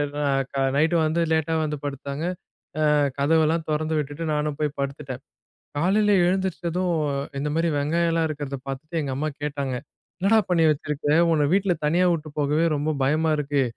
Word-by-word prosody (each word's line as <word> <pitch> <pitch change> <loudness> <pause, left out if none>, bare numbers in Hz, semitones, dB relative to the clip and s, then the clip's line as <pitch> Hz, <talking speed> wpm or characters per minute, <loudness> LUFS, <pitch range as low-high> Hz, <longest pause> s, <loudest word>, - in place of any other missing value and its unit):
நா 145 - -1 0.3
கா 135 - 0
நைட் 155 +4 +3
வந்து 165 +2 +1
லேட்டா 160 0 +1
வந்து 150 -1 -2
படுத்தாங்க. 140 +2 -4 0.7
ஆ - - +4 0.3
கதவெல்லாம் 160 +2 +2
தொறந்து 155 +1 0
விட்டுட்டு 145 +2 -3
நானும் 150 -1 -1
போய் 150 -2 -2
படுத்துட்டேன். 140 -2 -4 0.6
காலையில 205 +6 +3
எழுந்துருச்சதும் 180 -1 0 0.5
இந்த 150 +1 -1
மாதிரி 165 +1 +2
வெங்காயம் 165 +4 +1
எல்லாம் 165 -1 +1
இருக்குறத 145 -2 -4
பார்த்துட்டு 155 +5 -4
எங்க 140 -3 -3
அம்மா 150 +3 -1
கேட்டாங்க, 140 -3 -2 0.4
"என்னடா 205 +4 +4
பண்ணி 170 -2 +3
வச்சிருக்க? 150 0 -3 0.2
உன்னை 150 -2 +3
வீட்டுல 195 -2 +2
தனியா 175 +4 +3
விட்டு 155 -2 -4
போகவே 150 +3 +2
ரொம்ப 150 +2 0
பயமா 155 +4 +2
இருக்கு. 145 -1 +1
155 Hz, 155 wpm, -24 LUFS, 145-165 Hz, 0.7 s, ஆ